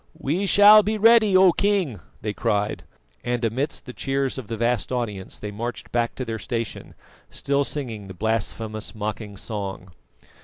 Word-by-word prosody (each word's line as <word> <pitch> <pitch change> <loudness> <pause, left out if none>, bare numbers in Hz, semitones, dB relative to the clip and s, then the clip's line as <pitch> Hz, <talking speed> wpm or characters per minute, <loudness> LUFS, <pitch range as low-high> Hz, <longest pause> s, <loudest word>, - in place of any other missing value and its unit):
"We 175 +9 -1
shall 205 +2 +8
be 215 +2 -1
ready, 220 -2 +6
O 185 -1 +7
King," 190 - 0 0.2
they 105 -1 -3
cried; 105 -2 -1 0.4
and 120 -1 -1
amidst 130 +7 -2
the 125 - -8
cheers 135 0 -1
of 125 - -9
the 115 +1 -4
vast 120 -2 0
audience 105 -7 -3
they 105 - -6
marched 120 +4 -6
back 120 -1 0
to 130 - -4
their 110 -1 -4
station, 115 -2 -5 0.3
still 140 0 0
singing 120 -9 -6
the 95 - -9
blasphemous 110 +1 -3
mocking 105 -1 -5
song. 95 -3 -5
120 Hz, 160 wpm, -24 LUFS, 105-140 Hz, 0.4 s, shall